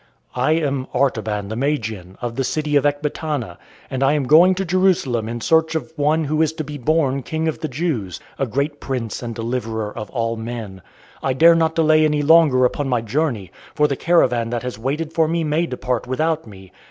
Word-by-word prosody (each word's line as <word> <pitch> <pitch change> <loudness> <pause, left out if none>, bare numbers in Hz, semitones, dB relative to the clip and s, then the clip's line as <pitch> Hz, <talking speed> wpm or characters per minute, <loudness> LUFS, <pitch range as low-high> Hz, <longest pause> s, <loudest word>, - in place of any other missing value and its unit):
"I 130 +5 +2
am 140 -5 -1
Artaban 110 -6 0
the 110 - -4
Magian, 110 -9 -3
of 120 -1 -3
the 135 - -1
city 150 +2 -1
of 145 0 +4
Ecbatana, 145 - -3 0.3
and 130 - -4
I 135 +1 +4
am 150 -2 +1
going 165 +8 +6
to 195 +1 -2
Jerusalem 170 - +1
in 120 0 -5
search 160 +2 +2
of 160 0 -4
one 155 +2 +1
who 155 +1 0
is 160 -1 +1
to 160 -1 -4
be 150 0 -7
born 140 0 +1
King 160 +4 -3
of 160 - -2
the 160 - -3
Jews, 130 - -3 0.2
a 135 - 0
great 140 +5 -2
Prince 125 -5 -4
and 120 -2 -5
Deliverer 115 -2 -3
for 115 - -6
all 115 -2 -2
men. 110 -4 -6 0.4
I 135 - 0
dare 165 +6 +6
not 160 -1 +1
delay 155 -1 +4
any 150 -1 +1
longer 150 -5 +5
upon 135 +2 -1
my 125 -3 +1
journey, 115 - -2 0.2
for 150 - +3
the 140 - -1
caravan 125 -8 +2
that 120 -1 -3
has 125 -2 -5
waited 150 +6 -3
for 160 -1 +2
me 165 +1 0
may 155 +3 0
depart 125 -3 -3
without 155 +3 -1
me. 95 -3 -13
140 Hz, 205 wpm, -20 LUFS, 120-155 Hz, 0.4 s, going